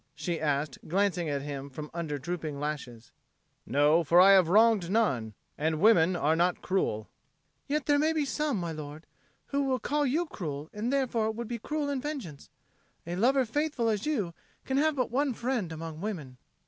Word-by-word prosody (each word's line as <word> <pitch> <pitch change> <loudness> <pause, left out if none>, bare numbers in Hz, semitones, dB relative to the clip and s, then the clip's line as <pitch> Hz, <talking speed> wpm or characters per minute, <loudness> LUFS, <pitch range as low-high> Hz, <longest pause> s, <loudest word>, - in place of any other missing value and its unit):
she 160 +3 -3
asked, 145 -1 -1
glancing 180 -2 +1
at 140 -1 -2
him 140 -1 -5
from 150 +3 -8
under 160 -4 -3
drooping 155 -1 -4
lashes. 130 -6 -5 0.6
"No, 150 +4 +4
for 165 +3 +5
I 190 +2 +8
have 185 -4 +6
wronged 215 -2 +4
none; 130 - +1 0.2
and 155 +1 0
women 185 -4 +5
are 155 -1 +2
not 175 +2 +1
cruel." 110 - -1 0.6
"Yet 295 0 -1
there 290 -1 +3
may 310 +2 +3
be 310 -2 0
some, 295 -3 -1
my 170 -2 -3
lord, 155 0 -8 0.4
who 275 -2 +1
call 290 +4 0
you 315 +7 +1
cruel 155 - -6
and 220 +4 -2
therefore 240 -5 +1
would 230 +1 -4
be 235 0 -4
cruel 295 +5 -2
in 280 -2 -2
vengeance. 255 - -6 0.6
A 170 +1 -4
lover 255 +7 +3
faithful 280 -1 0
as 215 +3 -1
you 210 - -1 0.3
can 265 - -1
have 310 +1 +2
but 255 -4 -1
one 270 0 +1
friend 235 -8 -2
among 160 0 -7
women." 160 -12 -5
185 Hz, 180 wpm, -29 LUFS, 155-260 Hz, 0.6 s, I